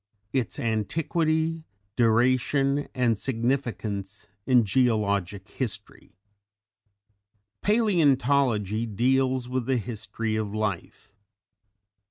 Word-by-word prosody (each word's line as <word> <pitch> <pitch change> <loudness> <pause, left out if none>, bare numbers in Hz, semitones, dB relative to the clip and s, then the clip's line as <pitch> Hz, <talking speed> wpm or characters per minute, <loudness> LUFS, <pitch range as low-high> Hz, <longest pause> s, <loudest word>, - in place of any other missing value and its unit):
ITS 130 -4 -1
ANTIQUITY, 160 +7 -1 0.3
DURATION 130 +4 +2
AND 120 -4 +1
SIGNIFICANCE 110 -4 -2 0.2
IN 125 -4 +5
GEOLOGIC 100 -4 0
HISTORY. 120 -8 -6 1.5
Palæontology 135 - +2
deals 130 +2 +1
with 130 -1 -2
the 130 -1 +2
History 110 -1 -4
of 105 -1 -3
Life. 105 -1 -4
120 Hz, 75 wpm, -26 LUFS, 110-135 Hz, 1.5 s, IN